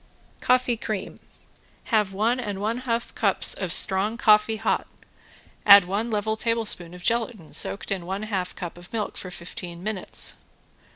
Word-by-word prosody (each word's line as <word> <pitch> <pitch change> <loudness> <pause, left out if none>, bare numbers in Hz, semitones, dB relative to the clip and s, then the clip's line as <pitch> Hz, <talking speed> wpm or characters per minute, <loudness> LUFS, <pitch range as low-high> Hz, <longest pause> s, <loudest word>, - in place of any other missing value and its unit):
~COFFEE 250 -1 +2
CREAM~ 215 -3 -5 0.7
Have 210 -3 +3
one 220 +6 +1
and 205 -5 -4
one 220 +4 -1
half 230 0 -1
cups - - +2
of - - -3
strong 200 +4 +3
coffee 215 -1 +4
hot, 220 +1 -1 0.8
add 200 -2 +9
one 205 +6 -2
level 220 0 -1
tablespoon 220 -7 0
of 180 - -12
gelatin 230 -7 -1
soaked 195 - -2
in 185 -3 -3
one 195 +3 -3
half 195 -4 -3
cup 175 0 -7
of 175 - -14
milk 220 -2 -3
for 185 - -6
fifteen 175 0 -8
minutes. 210 -2 -4
210 Hz, 155 wpm, -25 LUFS, 185-225 Hz, 0.8 s, add